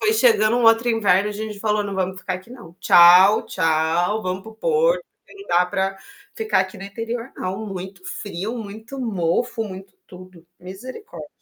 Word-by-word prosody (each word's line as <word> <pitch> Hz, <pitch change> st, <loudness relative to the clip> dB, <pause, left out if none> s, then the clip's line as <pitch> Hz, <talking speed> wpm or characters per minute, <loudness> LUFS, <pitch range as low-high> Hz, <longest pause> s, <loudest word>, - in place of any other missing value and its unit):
foi 430 Hz, +1 st, +2 dB
chegando 435 Hz, -, +3 dB
um 240 Hz, -, +1 dB
outro 225 Hz, +1 st, +5 dB
inverno, 205 Hz, -3 st, +2 dB
a -, -, -4 dB
gente 210 Hz, 0 st, -6 dB
falou: 210 Hz, -1 st, 0 dB
"Não 200 Hz, -, -5 dB
vamos 185 Hz, 0 st, -2 dB
ficar 185 Hz, -, -3 dB
aqui 185 Hz, +5 st, -10 dB
não. 235 Hz, -10 st, -12 dB
Tchau, 180 Hz, +4 st, +7 dB
tchau, 165 Hz, +6 st, 0 dB
vamos 185 Hz, 0 st, -3 dB
para 220 Hz, -, -11 dB
o 220 Hz, -, -16 dB
Porto, 485 Hz, -, +1 dB, 0.3 s
não 400 Hz, 0 st, -13 dB
dá 175 Hz, +1 st, +3 dB
pra 190 Hz, +1 st, -2 dB, 0.4 s
ficar 220 Hz, -3 st, 0 dB
aqui 190 Hz, +1 st, -4 dB
no 195 Hz, -, -9 dB
interior, 230 Hz, +4 st, -5 dB
não", 190 Hz, +4 st, -4 dB
muito 190 Hz, -1 st, -8 dB
frio, 205 Hz, +5 st, -5 dB
muito 220 Hz, +5 st, -9 dB
mofo, 225 Hz, +1 st, -1 dB
muito 190 Hz, -2 st, -9 dB
tudo, 185 Hz, -2 st, -14 dB
misericórdia. 245 Hz, -, -10 dB
200 Hz, 180 wpm, -21 LUFS, 185-225 Hz, 0.4 s, Tchau